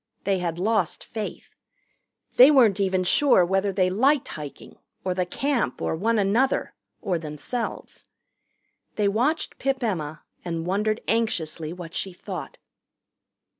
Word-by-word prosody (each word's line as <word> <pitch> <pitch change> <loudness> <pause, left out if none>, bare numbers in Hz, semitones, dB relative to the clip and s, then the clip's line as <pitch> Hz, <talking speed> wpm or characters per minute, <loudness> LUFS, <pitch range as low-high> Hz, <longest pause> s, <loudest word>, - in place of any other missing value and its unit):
They 195 -1 +1
had 170 -2 -2
lost 200 -2 0
faith. 220 -2 -6 0.8
They 255 +3 +9
weren't 235 -9 +5
even 190 -2 +1
sure 190 0 +4
whether 195 +2 +1
they 185 -1 +1
liked 265 +7 +2
hiking, 150 -2 -9 0.3
or 185 - +1
the 180 -1 -1
Camp, 275 +4 -1
or - - -1
one 225 +7 +1
another, 215 +7 +1 0.3
or 185 -6 0
themselves. 160 - -5 0.9
They 210 -1 +2
watched 245 +11 0
Pip 270 -1 -1
Emma 155 -8 -3 0.2
and 165 -2 -3
wondered 210 +4 0
anxiously 165 -8 -1
what 170 -1 -8
she 190 0 -4
thought. - - -7
195 Hz, 130 wpm, -25 LUFS, 175-230 Hz, 0.9 s, They